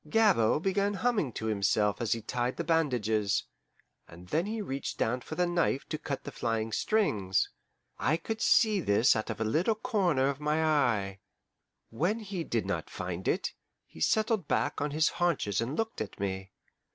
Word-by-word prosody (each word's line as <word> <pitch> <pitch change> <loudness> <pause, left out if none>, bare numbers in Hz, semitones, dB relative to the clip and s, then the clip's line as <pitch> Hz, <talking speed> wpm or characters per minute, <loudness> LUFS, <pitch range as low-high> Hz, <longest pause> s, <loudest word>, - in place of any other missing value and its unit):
Gabord 175 - +3
began 200 +1 +1
humming 210 - 0
to 110 - -5
himself 105 0 +1
as 115 0 +2
he 115 -2 -5
tied 120 +2 -2
the - - -1
bandages, 110 - +1 0.6
and 90 +2 -13
then 165 +5 +1
he 220 +1 -3
reached 140 -10 -4
down 125 +3 0
for 155 - -7
the 180 - +2
knife 170 -5 0
to 155 - -3
cut 140 -3 -4
the - - -6
flying 115 -1 -2
strings. 105 - +1 0.5
I 155 +3 +2
could 220 +6 -5
see 215 -3 +4
this 110 - +4
out 110 +1 -2
of 110 - -4
a - - +1
little 165 - +1
corner 195 - +1
of 140 0 -3
my 150 +2 +1
eye. 105 -11 +1 0.7
When 175 - 0
he 195 -5 -4
did 115 -7 -1
not - - -3
find 90 0 -5
it, - - 0 0.3
he 80 - -14
settled 215 - +2
back - - 0
on 145 - 0
his 155 +2 +2
haunches 155 - +1
and 125 +6 -2
looked 225 - -2
at 105 - -6
me. 95 -1 -3
140 Hz, 180 wpm, -30 LUFS, 110-185 Hz, 0.7 s, see